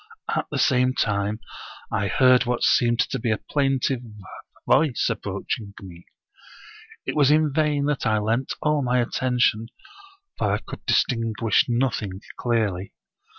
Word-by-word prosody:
At -, -, -1 dB
the -, -, -3 dB
same 130 Hz, -2 st, +2 dB
time 105 Hz, 0 st, -1 dB, 0.5 s
I 100 Hz, -, 0 dB
heard 130 Hz, +2 st, +4 dB
what 125 Hz, -1 st, -1 dB
seemed 120 Hz, -1 st, +3 dB
to 135 Hz, -, -2 dB
be 115 Hz, -, -2 dB
a 110 Hz, -, +1 dB
plaintive 135 Hz, -2 st, 0 dB, 0.7 s
voice 150 Hz, -7 st, +3 dB
approaching 100 Hz, -3 st, -5 dB
me. 90 Hz, -3 st, -12 dB, 1.0 s
It -, -, -3 dB
was 145 Hz, -2 st, +4 dB
in 150 Hz, -1 st, +3 dB
vain 150 Hz, -2 st, +1 dB
that 145 Hz, -4 st, -1 dB
I 110 Hz, -1 st, +2 dB
lent 115 Hz, +5 st, -1 dB
all 150 Hz, -1 st, +2 dB
my 125 Hz, -1 st, +1 dB
attention, 120 Hz, -2 st, +1 dB, 0.7 s
for -, -, +1 dB
I -, -, +2 dB
could -, -, -10 dB
distinguish 115 Hz, -2 st, +2 dB
nothing 115 Hz, -6 st, -1 dB, 0.2 s
clearly. 105 Hz, -6 st, -1 dB
120 Hz, 140 wpm, -24 LUFS, 110-135 Hz, 1.0 s, heard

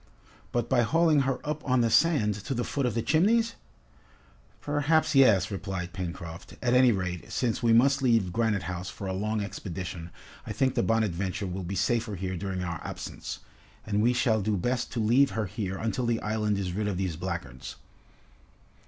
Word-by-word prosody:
"But 120 Hz, -1 st, 0 dB
by 125 Hz, -1 st, +3 dB
hauling 160 Hz, +5 st, +3 dB
her 130 Hz, -, 0 dB
up 150 Hz, 0 st, -3 dB
on 130 Hz, -2 st, +2 dB
the 115 Hz, -1 st, +2 dB
sand, 115 Hz, -4 st, +4 dB
to 135 Hz, -, -2 dB
the 120 Hz, -, -1 dB
foot 140 Hz, 0 st, -1 dB
of 120 Hz, -, -2 dB
the 115 Hz, -, 0 dB
Chimneys?" 225 Hz, +8 st, +3 dB, 1.1 s
"Perhaps 145 Hz, +2 st, +1 dB
yes," 110 Hz, -8 st, +5 dB
replied 95 Hz, -3 st, -4 dB
Pencroft. 85 Hz, -2 st, -7 dB
"At 120 Hz, -1 st, +1 dB
any 125 Hz, -1 st, +6 dB
rate, 90 Hz, -4 st, -3 dB
since 120 Hz, -1 st, -1 dB
we 115 Hz, -2 st, +3 dB
must 135 Hz, +5 st, +4 dB
leave 115 Hz, -8 st, +2 dB
Granite 110 Hz, -3 st, +1 dB
House 90 Hz, +1 st, -4 dB
for 100 Hz, -, -8 dB
a 95 Hz, -, -2 dB
long 105 Hz, +3 st, -1 dB
expedition, 90 Hz, -4 st, -6 dB, 0.4 s
I -, -, -3 dB
think 130 Hz, +5 st, +1 dB
the -, -, +1 dB
'Bonadventure' 100 Hz, -3 st, 0 dB
will 95 Hz, +1 st, -4 dB
be 95 Hz, +2 st, -4 dB
safer 110 Hz, +2 st, 0 dB
here 95 Hz, 0 st, -3 dB
during 95 Hz, 0 st, -3 dB
our 85 Hz, -1 st, -4 dB
absence, -, -, -6 dB, 0.4 s
and 105 Hz, -1 st, 0 dB
we 120 Hz, +3 st, +4 dB
shall 120 Hz, -3 st, +2 dB
do 105 Hz, +1 st, 0 dB
best 125 Hz, +6 st, -1 dB
to 120 Hz, -, -2 dB
leave 120 Hz, +4 st, +3 dB
her 110 Hz, -, 0 dB
here 95 Hz, 0 st, -4 dB
until 115 Hz, +3 st, -1 dB
the 115 Hz, -1 st, +1 dB
island 105 Hz, -1 st, 0 dB
is 95 Hz, -3 st, -2 dB
rid 105 Hz, +2 st, -1 dB
of 100 Hz, -3 st, -2 dB
these 95 Hz, -4 st, -2 dB
blackguards." 85 Hz, -8 st, -5 dB
110 Hz, 190 wpm, -28 LUFS, 95-125 Hz, 1.1 s, any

